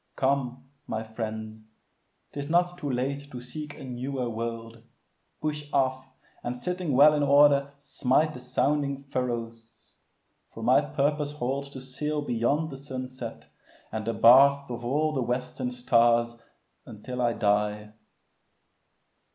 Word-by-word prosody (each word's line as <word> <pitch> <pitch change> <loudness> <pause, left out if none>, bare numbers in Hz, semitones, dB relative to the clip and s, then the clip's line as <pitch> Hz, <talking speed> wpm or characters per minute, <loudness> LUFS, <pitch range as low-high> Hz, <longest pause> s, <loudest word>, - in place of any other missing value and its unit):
Come, 130 -2 0 0.2
my 110 0 -3
friends. 110 -1 -6 0.7
'Tis 145 0 -5
not 175 +1 +2
too 145 -4 -3
late 140 +3 -2
to 125 - -7
seek 145 +5 -7
a - - -10
newer 130 0 -3
world. 115 0 -5 0.6
Push 150 -1 -3
off, 130 -1 0 0.3
and 120 +1 -4
sitting 180 +1 -2
well 145 +4 +7
in 150 - +1
order 140 0 +5
smite 140 +2 +1
The 125 - -8
sounding 140 +2 0
furrows; 115 -4 -5 0.6
for 115 - -7
my 125 +4 +5
purpose 145 0 -1
holds 140 0 -3
To 135 -2 -9
sail 150 +3 -3
beyond 140 +5 0
the 135 - -7
sunset, 130 - -7 0.4
and 110 0 -3
the 115 +1 -1
baths 140 +4 +6
Of 120 0 -5
all 150 +5 +1
the 135 - 0
western 125 - -2
stars, 120 - +3 0.5
until 125 +2 -6
I 120 -1 +2
die. 105 0 0
130 Hz, 135 wpm, -27 LUFS, 120-145 Hz, 0.7 s, well